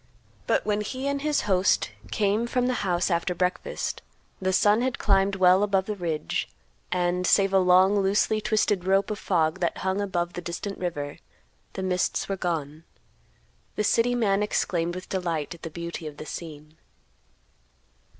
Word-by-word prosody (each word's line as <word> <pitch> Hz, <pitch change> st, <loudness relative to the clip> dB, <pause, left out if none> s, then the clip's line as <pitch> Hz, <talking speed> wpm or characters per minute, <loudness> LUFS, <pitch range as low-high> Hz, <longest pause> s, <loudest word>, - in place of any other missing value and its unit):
But -, -, +1 dB
when 210 Hz, 0 st, 0 dB
he 260 Hz, +6 st, -4 dB
and 280 Hz, 0 st, -1 dB
his 300 Hz, 0 st, +1 dB
host 185 Hz, -, +2 dB, 0.2 s
came 210 Hz, -, +1 dB
from 250 Hz, 0 st, 0 dB
the 255 Hz, -, +1 dB
house 180 Hz, -2 st, 0 dB
after 170 Hz, +1 st, 0 dB
breakfast, 180 Hz, 0 st, -2 dB, 0.4 s
the 190 Hz, 0 st, +1 dB
sun 205 Hz, +4 st, +4 dB
had 255 Hz, 0 st, -1 dB
climbed 195 Hz, -1 st, +2 dB
well 185 Hz, 0 st, +5 dB
above 195 Hz, -2 st, +1 dB
the 210 Hz, -, -3 dB
ridge, 160 Hz, -, -2 dB, 0.4 s
and, 180 Hz, 0 st, 0 dB
save 195 Hz, -1 st, +4 dB
a 195 Hz, -, +6 dB
long, 185 Hz, +2 st, +5 dB
loosely 205 Hz, +2 st, +2 dB
twisted 210 Hz, -4 st, +1 dB
rope 195 Hz, +2 st, +2 dB
of 210 Hz, -, -4 dB
fog 160 Hz, -4 st, +1 dB
that 170 Hz, -, -1 dB
hung 190 Hz, +1 st, -1 dB
above 175 Hz, -3 st, -2 dB
the 175 Hz, -, -5 dB
distant 175 Hz, +4 st, -5 dB
river, 145 Hz, -5 st, -4 dB, 0.5 s
the 190 Hz, -, -4 dB
mists 180 Hz, -1 st, 0 dB
were 195 Hz, -, -1 dB
gone. 160 Hz, -4 st, -3 dB, 0.9 s
The 210 Hz, -, 0 dB
city 235 Hz, +3 st, +2 dB
man 205 Hz, -4 st, +2 dB
exclaimed 175 Hz, -4 st, 0 dB
with 185 Hz, -, -7 dB
delight 170 Hz, -5 st, -2 dB
at 170 Hz, -, -14 dB
the 165 Hz, -, -6 dB
beauty 170 Hz, 0 st, -6 dB
of 145 Hz, -1 st, -9 dB
the 155 Hz, -, -8 dB
scene. 155 Hz, -1 st, -9 dB
185 Hz, 170 wpm, -26 LUFS, 175-205 Hz, 0.9 s, a